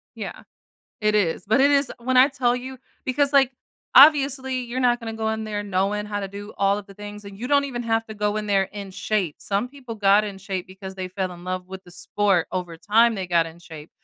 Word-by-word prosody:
Yeah, -, -, -7 dB, 0.6 s
it 210 Hz, 0 st, +2 dB
is. 180 Hz, -5 st, +1 dB
But 220 Hz, +6 st, +3 dB
it 285 Hz, -, +5 dB
is 280 Hz, -2 st, +3 dB
when 255 Hz, +2 st, -1 dB
I 260 Hz, +2 st, +7 dB
tell 255 Hz, -3 st, +1 dB
you 260 Hz, +1 st, -7 dB, 0.3 s
because, 280 Hz, +2 st, +1 dB
like, 270 Hz, -2 st, +4 dB, 0.4 s
obviously, 270 Hz, -2 st, +6 dB
you're 245 Hz, +2 st, -4 dB
not 245 Hz, -1 st, +2 dB
gonna 225 Hz, -1 st, -5 dB
go 220 Hz, 0 st, -1 dB
in 220 Hz, 0 st, -3 dB
there 210 Hz, -1 st, -3 dB
knowing 200 Hz, +1 st, -1 dB
how 205 Hz, -1 st, -3 dB
to 195 Hz, -, -4 dB
do 205 Hz, +2 st, -9 dB
all 200 Hz, +1 st, +2 dB
of 205 Hz, -, -9 dB
the 195 Hz, -, -14 dB
things, 205 Hz, +1 st, -9 dB
and 200 Hz, -1 st, -10 dB
you 245 Hz, +3 st, -5 dB
don't 285 Hz, -1 st, +4 dB
even 245 Hz, -3 st, -4 dB
have 225 Hz, 0 st, 0 dB
to 220 Hz, -, -8 dB
go 210 Hz, 0 st, -1 dB
in 215 Hz, 0 st, -3 dB
there 195 Hz, -2 st, +2 dB
in 200 Hz, 0 st, -8 dB
shape. 190 Hz, -5 st, -1 dB
Some 200 Hz, +5 st, -2 dB
people 255 Hz, -4 st, -9 dB
got 205 Hz, 0 st, +4 dB
in 200 Hz, -2 st, -6 dB
shape 190 Hz, -2 st, -5 dB
because 190 Hz, 0 st, -9 dB
they 185 Hz, -1 st, -4 dB
fell 185 Hz, 0 st, -3 dB
in 175 Hz, 0 st, -12 dB
love 185 Hz, 0 st, -4 dB
with 190 Hz, 0 st, -8 dB
the 175 Hz, -, -15 dB
sport. 185 Hz, 0 st, 0 dB
Over 180 Hz, -3 st, -4 dB
time, 225 Hz, +6 st, +3 dB
they 190 Hz, -3 st, -4 dB
got 170 Hz, -2 st, +2 dB
in 165 Hz, +1 st, -11 dB
shape. 160 Hz, -2 st, -12 dB
210 Hz, 245 wpm, -23 LUFS, 190-245 Hz, 0.6 s, I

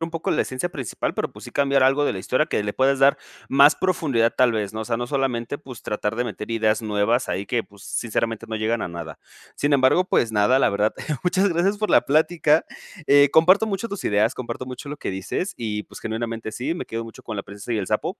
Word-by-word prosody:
un 165 Hz, 0 st, -3 dB
poco 165 Hz, -1 st, -3 dB
la -, -, +2 dB
esencia 130 Hz, +7 st, -3 dB
principal, 135 Hz, -9 st, -4 dB
pero -, -, -3 dB
pues -, -, -12 dB
sí, -, -, -9 dB
cambiar 140 Hz, -1 st, +2 dB
algo 135 Hz, +3 st, +3 dB
de -, -, +1 dB
la 95 Hz, -, -5 dB
historia 130 Hz, +10 st, 0 dB
que -, -, -1 dB
le 105 Hz, 0 st, -3 dB
puedes 135 Hz, +1 st, +2 dB
dar 135 Hz, +1 st, +5 dB, 0.3 s
más 140 Hz, +2 st, +6 dB
profundidad 140 Hz, -11 st, +1 dB
tal 125 Hz, -2 st, +4 dB
vez, 105 Hz, -2 st, -2 dB
¿no? 110 Hz, -, -5 dB
O -, -, -4 dB
sea, 115 Hz, +1 st, -1 dB
no 120 Hz, 0 st, -3 dB
solamente 135 Hz, -1 st, -2 dB
pues 130 Hz, -6 st, -11 dB
tratar 105 Hz, 0 st, -2 dB
de 125 Hz, -, 0 dB
meter 105 Hz, -1 st, -6 dB
ideas 110 Hz, 0 st, +1 dB
nuevas 110 Hz, +3 st, 0 dB
ahí 100 Hz, +1 st, -2 dB
que 120 Hz, -2 st, 0 dB
pues 100 Hz, 0 st, -18 dB
sinceramente, 115 Hz, -1 st, -2 dB
no 110 Hz, -, -3 dB
llegan 110 Hz, +2 st, -1 dB
a -, -, -3 dB
nada. 85 Hz, -2 st, -8 dB, 0.4 s
Sin 145 Hz, +1 st, 0 dB
embargo, 135 Hz, +6 st, +4 dB
pues 115 Hz, -11 st, +1 dB
nada, 105 Hz, +6 st, +3 dB
la -, -, +4 dB
verdad 105 Hz, +2 st, +1 dB, 0.3 s
muchas 190 Hz, +3 st, +2 dB
gracias 190 Hz, +4 st, +1 dB
por 215 Hz, 0 st, -1 dB
la -, -, +6 dB
plática, 155 Hz, +1 st, +2 dB, 0.4 s
eh, 145 Hz, 0 st, +6 dB
comparto 185 Hz, +7 st, +5 dB
mucho 215 Hz, +2 st, -3 dB
tus 200 Hz, -2 st, -6 dB
ideas 105 Hz, +4 st, +2 dB
comparto 125 Hz, 0 st, -6 dB
mucho 130 Hz, +3 st, -8 dB
lo 145 Hz, -, -5 dB
que -, -, -4 dB
dices 95 Hz, -, -3 dB
y 105 Hz, -2 st, -3 dB
pues -, -, -12 dB
genuinamente 115 Hz, 0 st, -4 dB
sí, 135 Hz, +8 st, -2 dB
me -, -, -5 dB
quedo 115 Hz, 0 st, -4 dB
mucho 115 Hz, -, -12 dB
con 110 Hz, -, -6 dB
La 100 Hz, -, -3 dB
Princesa 100 Hz, +4 st, -7 dB
y 110 Hz, -, 0 dB
el 95 Hz, -, -3 dB
Sapo, -, -, -1 dB
120 Hz, 245 wpm, -23 LUFS, 110-145 Hz, 0.4 s, más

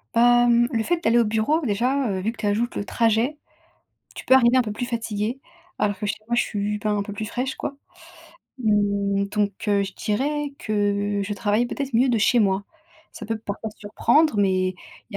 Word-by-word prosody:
Bah, 240 Hz, +1 st, +5 dB
mmh, 240 Hz, 0 st, +4 dB
le 230 Hz, -, 0 dB
fait 345 Hz, +3 st, -1 dB
d'aller 230 Hz, -3 st, +3 dB
au 235 Hz, -, +4 dB
bureau, 220 Hz, +9 st, +1 dB
déjà, 250 Hz, +5 st, 0 dB
heu, 190 Hz, -1 st, -2 dB
vu 220 Hz, -, -1 dB
que 230 Hz, -, -17 dB
tu 215 Hz, -, -4 dB
ajoutes 225 Hz, +4 st, 0 dB
le 200 Hz, -, -3 dB
trajet, 230 Hz, +7 st, +1 dB, 0.8 s
tu -, -, -7 dB
peux 260 Hz, -, +5 dB
arriver 250 Hz, -1 st, +5 dB
un 255 Hz, -, +5 dB
peu 215 Hz, -2 st, -5 dB
plus 245 Hz, +4 st, -4 dB
fatiguée. 230 Hz, 0 st, -3 dB, 0.4 s
Alors 205 Hz, -1 st, 0 dB
que 210 Hz, -, -4 dB
chez 210 Hz, -, -2 dB
moi, 240 Hz, -, -1 dB
je 240 Hz, -, +3 dB
suis, 210 Hz, 0 st, -2 dB
ben, 210 Hz, 0 st, -1 dB
un 200 Hz, -, -1 dB
peu 205 Hz, -, -7 dB
plus 215 Hz, +2 st, -4 dB
fraîche 250 Hz, +4 st, -3 dB
quoi. 280 Hz, -, -5 dB, 0.8 s
Mmh, 200 Hz, -3 st, +1 dB
donc 205 Hz, 0 st, 0 dB, 0.2 s
heu, 200 Hz, -1 st, +3 dB
je 195 Hz, -1 st, -6 dB
dirais 285 Hz, +7 st, -2 dB
que 205 Hz, -1 st, 0 dB
je 205 Hz, -, -4 dB
travaille 205 Hz, +3 st, +1 dB
peut-être 265 Hz, +1 st, -5 dB
mieux 250 Hz, +3 st, +4 dB
de 235 Hz, -, +2 dB
chez 235 Hz, +3 st, +3 dB
moi. 195 Hz, -1 st, +1 dB, 0.5 s
Ça -, -, -9 dB
peut 225 Hz, 0 st, -3 dB
parfois 215 Hz, 0 st, -5 dB
surprendre, 235 Hz, +7 st, +2 dB
mais 185 Hz, -2 st, +2 dB, 0.4 s
il 200 Hz, -, -6 dB
220 Hz, 210 wpm, -23 LUFS, 205-240 Hz, 0.8 s, Bah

